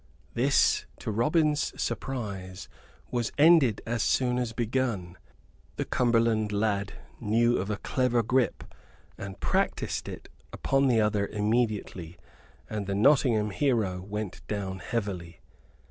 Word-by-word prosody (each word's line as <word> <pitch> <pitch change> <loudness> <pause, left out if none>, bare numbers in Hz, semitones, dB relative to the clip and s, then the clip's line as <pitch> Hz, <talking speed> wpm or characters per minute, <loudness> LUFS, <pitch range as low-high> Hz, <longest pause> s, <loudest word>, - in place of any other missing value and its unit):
This, 135 +4 +3
to - - -4
Robin's 150 +6 +1
surprise, 100 -7 -4 0.4
was 120 -2 -1
ended 145 - +5
as 115 0 -1
soon 125 -1 +1
as 120 -2 -2
begun. 115 -6 -2 0.6
The - - -2
Cumberland 115 -3 +2
lad 100 -1 0 0.3
knew 120 +2 +2
of 95 +2 -3
a 105 - -1
clever 125 -1 +1
grip, 125 +3 +1 0.5
and 100 -1 -8
practised - - -1
it - - -9 0.2
upon 135 0 +1
the 120 -3 +3
other 105 -2 +1
immediately, 105 -6 -1 0.5
and 105 -2 -4
the 100 - -1
Nottingham 110 -3 +3
hero 110 -9 0
went 100 -1 -5
down 95 -2 -3
heavily. 90 -8 -4
110 Hz, 120 wpm, -28 LUFS, 100-125 Hz, 0.6 s, ended